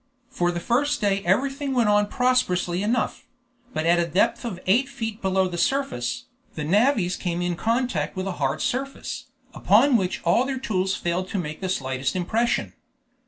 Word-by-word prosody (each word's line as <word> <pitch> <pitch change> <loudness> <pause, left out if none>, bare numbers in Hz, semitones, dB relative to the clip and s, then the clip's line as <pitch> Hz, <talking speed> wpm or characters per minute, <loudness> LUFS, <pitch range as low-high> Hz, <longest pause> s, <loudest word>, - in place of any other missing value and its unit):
For 175 0 0
the 175 - -3
first 285 +10 +1
day 200 -2 +1
everything 270 +8 0
went 235 -3 +3
on 205 0 +3
prosperously 195 -9 +1
enough; 225 +3 -1 0.4
but 155 - -2
at 170 +1 +4
a 170 - +1
depth 230 - +1
of 215 -7 -5
eight 245 +8 +3
feet 225 -5 -5
below 190 -1 +2
the 175 -1 -5
surface, 240 - -1 0.3
the 150 - -3
navvies 200 - +2
came 175 -1 -3
in 175 -1 -1
contact 240 +6 -1
with 185 0 -3
a 195 - -2
hard 135 -1 0
surface, 275 +2 -3 0.3
upon 280 -4 +4
which 185 -3 -2
all 175 +8 +3
their 265 0 -3
tools 190 -6 -1
failed 180 +2 -2
to 205 - -2
make 155 -2 -4
the 190 - -2
slightest 130 -5 -2
impression. 220 +7 0
200 Hz, 175 wpm, -24 LUFS, 175-245 Hz, 0.4 s, at